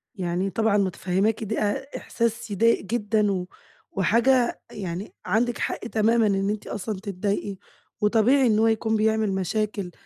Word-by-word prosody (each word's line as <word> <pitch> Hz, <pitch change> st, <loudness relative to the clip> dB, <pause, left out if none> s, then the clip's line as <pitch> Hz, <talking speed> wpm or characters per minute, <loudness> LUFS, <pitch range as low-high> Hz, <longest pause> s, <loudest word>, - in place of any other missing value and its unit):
يعني 180 Hz, +1 st, -1 dB
طبعًا 220 Hz, -1 st, +1 dB
متفهماكِ 195 Hz, +3 st, 0 dB
د 220 Hz, +1 st, -3 dB
أ 215 Hz, +7 st, -2 dB
إحساس 230 Hz, -1 st, -2 dB
يضايق 230 Hz, +4 st, +3 dB
جدًا، 210 Hz, -1 st, +1 dB
و 180 Hz, -2 st, -2 dB, 0.4 s
وحاجة 235 Hz, +6 st, +2 dB
يعني 190 Hz, -1 st, -5 dB
عندِك 240 Hz, +2 st, +1 dB
حق -, -, -2 dB
تمامًا 225 Hz, 0 st, +2 dB
إن 195 Hz, 0 st, +1 dB
أنتِ 210 Hz, 0 st, -4 dB
أصلًا 205 Hz, -1 st, -4 dB
تتضايقي، 200 Hz, 0 st, -3 dB, 0.4 s
وطبيعي 235 Hz, +5 st, +4 dB
إن 215 Hz, -1 st, +3 dB
هو 225 Hz, -, +4 dB
يكون 220 Hz, 0 st, +1 dB
بيعمل 220 Hz, -1 st, +1 dB
مشاكل، 195 Hz, 0 st, -2 dB
215 Hz, 145 wpm, -25 LUFS, 195-225 Hz, 0.4 s, وطبيعي